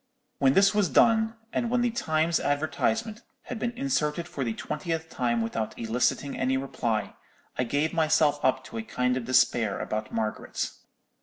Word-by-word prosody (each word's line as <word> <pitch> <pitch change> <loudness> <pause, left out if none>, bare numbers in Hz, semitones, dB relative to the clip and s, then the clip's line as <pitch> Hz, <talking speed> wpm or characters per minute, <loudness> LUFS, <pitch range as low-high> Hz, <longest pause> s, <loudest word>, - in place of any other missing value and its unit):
"When 135 -1 +4
this 195 +4 +5
was 205 -4 +2
done, 220 - +4 0.2
and 235 - 0
when 245 +1 +2
the 240 -1 +1
Times 160 -6 +1
advertisement 215 +10 -1 0.2
had 250 - -6
been 240 - 0
inserted 170 - 0
for 140 - -4
the 115 -3 -2
twentieth 165 0 -4
time 120 -2 0
without 115 -1 -3
eliciting 120 +4 0
any 130 +1 +1
reply, 120 -5 -2 0.4
I 125 - 0
gave 145 +6 0
myself 155 -2 +2
up 130 - +2
to 115 - -7
a - - -1
kind 125 +3 0
of 130 -2 -3
despair 120 -4 +3
about 110 0 -3
Margaret. 110 -1 -2
145 Hz, 165 wpm, -27 LUFS, 120-175 Hz, 0.4 s, this